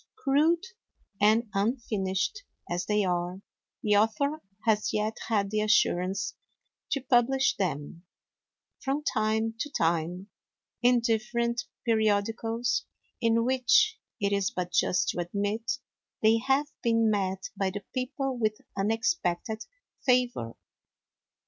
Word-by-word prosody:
Crude 330 0 +2 0.6
and 220 +3 +4
unfinished 205 - -1 0.3
as 175 +1 -2
they 210 -1 +2
are, 180 +1 -2 0.4
the 210 -1 +4
author 250 +9 +1 0.2
has 215 -2 +2
yet 215 +1 -1
had 205 -3 +1
the 215 0 +1
assurance 195 -2 +2 0.6
to 275 - 0
publish 260 +2 +3
them, 165 -2 -3 0.8
from 280 +2 -2
time 220 -2 0
to 295 - -2
time, 170 - 0 0.5
in 245 0 +4
different 235 +1 0 0.2
periodicals, 225 +2 +1 0.4
in 230 0 +3
which, 260 - +3 0.2
it 200 -1 +1
is 200 -1 +1
but 180 -1 -4
just 180 - +2
to - - -2
admit, 205 +7 -1 0.5
they 220 +1 +5
have 270 +4 +2 0.2
been 230 -1 +3
met 190 -2 -1
by 195 -1 0
the 200 +1 -6
people 265 +1 -2
with 215 -3 0 0.2
unexpected 220 - 0 0.4
favor. 245 - +1
220 Hz, 115 wpm, -28 LUFS, 195-245 Hz, 0.8 s, they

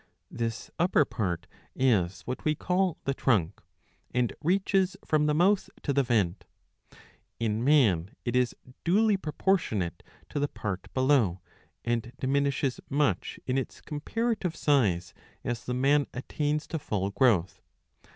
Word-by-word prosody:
^ - - -34 0.3
This 115 -1 -4
upper 175 -4 +4
part 90 -10 -2 0.3
is 100 -9 +2
what 125 - -5
we 155 0 +2
call 180 +1 0
the 135 - 0
trunk, 110 -12 +1 0.5
and 125 -2 0
reaches, 190 +2 +2
from 150 -1 +2
the 150 - +2
mouth 190 +5 +3
to 140 - 0
the 140 - +4
vent. 105 -8 +1 1.0
In 110 0 0
man 110 - +4 0.2
it 120 0 -1
is 125 -1 +2 0.3
duly 210 +4 +4
proportionate 150 - 0 0.3
to - - -2
the 145 - +1
part 95 -8 -5
below, 130 -9 +3 0.5
and 120 0 -1
diminishes 140 0 0
much 145 +1 0
in 130 +1 +1
its 130 - -6
comparative 190 +4 -2
size 95 - +2 0.3
as 120 -1 -3
the 125 - -2
man 140 +3 +3
attains 150 +4 -1
to 160 - -2
full 100 -8 -2
growth. 100 -7 +2
130 Hz, 140 wpm, -28 LUFS, 110-150 Hz, 1.0 s, upper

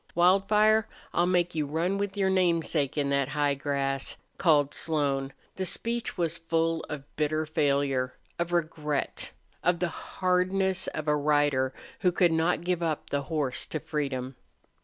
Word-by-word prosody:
"Wildfire, 210 +5 +4 0.3
I'll 175 +1 +3
make 175 -1 +2
you 155 -2 -1
run 170 +6 0
with 200 0 -2
your 190 -1 +2
namesake 165 -6 +1
in 140 -1 +1
that 140 -1 +2
high 145 -1 +1
grass," 140 -1 -2 0.2
called 145 -5 +4
Slone. 140 -4 0 0.3
The 190 - -1
speech 235 +2 -2
was 170 -2 -1
full 165 0 0
of 150 -3 -5
bitter 155 +1 0
failure, 140 -4 +1 0.2
of 170 0 -1
regret, 155 -4 -1 0.3
of 175 0 +3
the 175 0 0
hardness 185 +2 0
of 155 0 -4
a 150 - +4
rider 145 -3 +2 0.3
who 180 -2 +3
could 175 -1 +3
not 165 +1 +2
give 180 -1 0
up 160 -3 -2
the 140 - +1
horse 140 -3 -2
to 155 - -3
freedom. 135 -4 -3
160 Hz, 155 wpm, -28 LUFS, 145-180 Hz, 0.3 s, Wildfire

